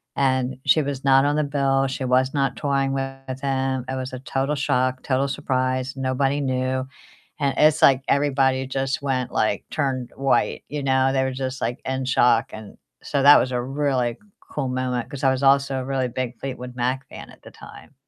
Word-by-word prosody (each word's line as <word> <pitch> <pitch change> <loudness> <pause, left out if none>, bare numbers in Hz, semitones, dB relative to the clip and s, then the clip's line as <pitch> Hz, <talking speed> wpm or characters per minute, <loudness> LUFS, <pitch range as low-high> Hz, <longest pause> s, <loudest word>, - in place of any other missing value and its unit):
And 130 -1 0
she 140 +3 +4
was 140 -1 -4
not 135 0 +5
on 145 +1 +1
the 150 - +2
bill, 135 -1 +1
she 130 0 -4
was 130 +2 +2
not 135 -3 0
touring 140 -2 0
with 135 -1 -5
him, 130 -2 -1
it 130 - -2
was 130 0 -4
a 130 - -5
total 135 +2 -2
shock, 130 -2 0
total 135 +1 0
surprise, 130 0 -1
nobody 135 +2 0
knew. 130 0 -1 0.5
And 140 -2 0
it's 155 +2 +4
like 135 -3 +5
everybody 135 -2 +2
just 135 +1 -2
went, 130 -3 -1
like 105 -2 0
turned 130 -4 -2
white, 135 -1 0
you 145 -1 -4
know? 130 0 +2
They 130 -1 +2
were 130 - -1
just, 130 0 -4
like, 120 +2 -2
in 130 0 -2
shock, 125 0 +3
and 110 -1 -10 0.3
so 140 -1 -1
that 145 +1 +9
was 130 - -1
a 125 -1 -1
really 130 -3 -1 0.2
cool 140 -3 -4
moment 125 -2 -2
'cause 140 0 -8
I 135 - +5
was 130 +1 -2
also 135 -1 +3
a - - -4
really 135 -2 -1
big 125 -1 -4
Fleetwood 125 -2 -6
Mac 130 +2 -2
fan - - -10
at - - -18
the - - -12
time. - - -14
130 Hz, 200 wpm, -23 LUFS, 130-135 Hz, 0.5 s, that